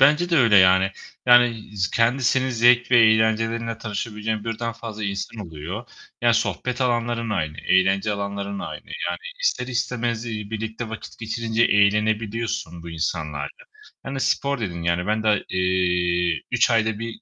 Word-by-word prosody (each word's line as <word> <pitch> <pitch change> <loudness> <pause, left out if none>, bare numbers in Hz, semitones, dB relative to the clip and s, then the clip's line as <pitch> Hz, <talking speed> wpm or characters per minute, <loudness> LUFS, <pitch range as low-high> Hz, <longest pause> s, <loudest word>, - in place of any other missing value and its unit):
Bence 150 +6 +4
de 170 - +3
öyle 115 -7 +5
yani. 95 +1 +5 0.4
Yani, 120 -4 +4
z 95 -2 0
kendisinin 130 +2 +2
zevk 120 +1 +4
ve 120 - +6
eğlencelerinle 115 +1 +2
tanışabileceğin 105 0 -4
birden 115 +1 -3
fazla 110 -2 -7
insan 100 +1 -4
oluyor. 85 +9 -7 0.4
Ya, 120 -1 +5
sohbet 125 +2 -1
alanların 120 -2 0
aynı, 75 -7 -2
eğlence 95 +3 +2
alanların 100 0 -4
aynı. - - -7
Yani 475 0 -4 0.2
ister 125 - 0
istemez, 120 -2 -2
iii, 105 -2 -5
birlikte 110 +1 -4
vakit 110 - -9
geçirince 115 0 -1
eğlenebiliyorsun 105 -3 +1
bu 85 - -8
insanlarla. 80 - -4 0.4
Hani, 135 0 -5
spor 140 +2 0
dedin, 85 -5 -4
yani, 85 +2 0
ben 110 +1 0
da 105 -2 +2
eee, 90 -2 +1
3 - - +3
ayda 110 -2 +1
1 115 - -4
110 Hz, 145 wpm, -23 LUFS, 100-120 Hz, 0.4 s, ve